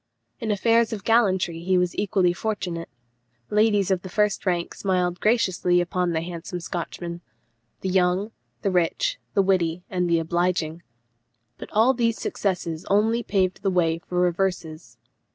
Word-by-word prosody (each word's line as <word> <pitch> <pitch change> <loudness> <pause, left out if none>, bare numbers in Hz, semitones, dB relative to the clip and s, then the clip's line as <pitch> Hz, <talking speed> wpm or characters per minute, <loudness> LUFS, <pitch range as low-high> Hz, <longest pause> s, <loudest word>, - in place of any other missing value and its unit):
In 225 - -3
affairs 225 +2 +3
of 210 -3 -5
gallantry 190 -7 +2
he 185 +2 +1
was 180 -1 0
equally 190 -3 +2
fortunate; 175 -4 -3 0.6
ladies 210 -2 +3
of 185 -2 +1
the 185 - -8
first 210 +1 0
rank 175 -2 0
smiled 180 -2 -1
graciously 185 -5 +2
upon 180 0 0
the 160 -1 0
handsome 175 +1 -6
Scotchman 170 0 -5 0.6
the 190 - -2
young, 185 +3 +1 0.3
the 195 - +1
rich, - - 0 0.2
the 195 - +4
witty, 180 -3 +1
and 180 -2 0
the 170 - +4
obliging. 170 0 -1 0.8
But - - -8
all 225 +5 +4
these 230 -2 0
successes 175 -4 -2
only 220 +4 +3
paved 190 -4 0
the 195 - +1
way 165 -3 +1
for 180 +1 -3
reverses. 175 -2 -1
185 Hz, 150 wpm, -24 LUFS, 175-205 Hz, 0.8 s, the